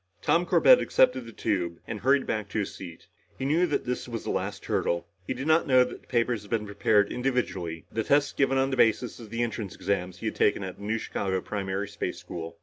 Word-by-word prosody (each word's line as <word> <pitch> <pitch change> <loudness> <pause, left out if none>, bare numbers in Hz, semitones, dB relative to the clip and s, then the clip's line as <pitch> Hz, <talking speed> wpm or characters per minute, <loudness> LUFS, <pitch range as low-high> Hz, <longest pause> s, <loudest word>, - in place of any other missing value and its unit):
Tom 175 +1 +2
Corbett - - +6
accepted - - +2
the - - -8
tube 90 -6 -1
and 110 -2 -5
hurried 135 +4 +3
back 105 -2 -2
to - - -4
his 105 - -2
seat. 85 -3 -10 0.3
He 130 - -3
knew 165 +6 +3
that - - -1
this 125 +1 -3
was 115 -2 -5
the - - -2
last - - -3
hurdle. 85 0 0 0.2
He - - -2
did 130 +3 -5
not 160 +1 +3
know 130 -1 +6
that 125 - -7
the - - -27
papers 120 -2 +1
had 105 - -14
been 110 -2 0
prepared 100 0 +2
individually, 100 -11 -2
the 110 - -1
tests 145 +4 +2
given 135 -1 +2
on 135 +1 +2
the 130 - -1
basis 120 +1 +2
of 115 -3 -10
the 115 +2 -1
entrance 110 -4 -4
exams 90 -2 -2
he 110 - -8
had 110 - -2
taken 100 - +2
back 95 - -3
at 90 - -12
New 105 +2 -1
Chicago 95 -3 -2
Primary 100 0 -3
Space 100 -3 -4
School. 85 -2 -7
110 Hz, 240 wpm, -27 LUFS, 95-130 Hz, 0.3 s, Corbett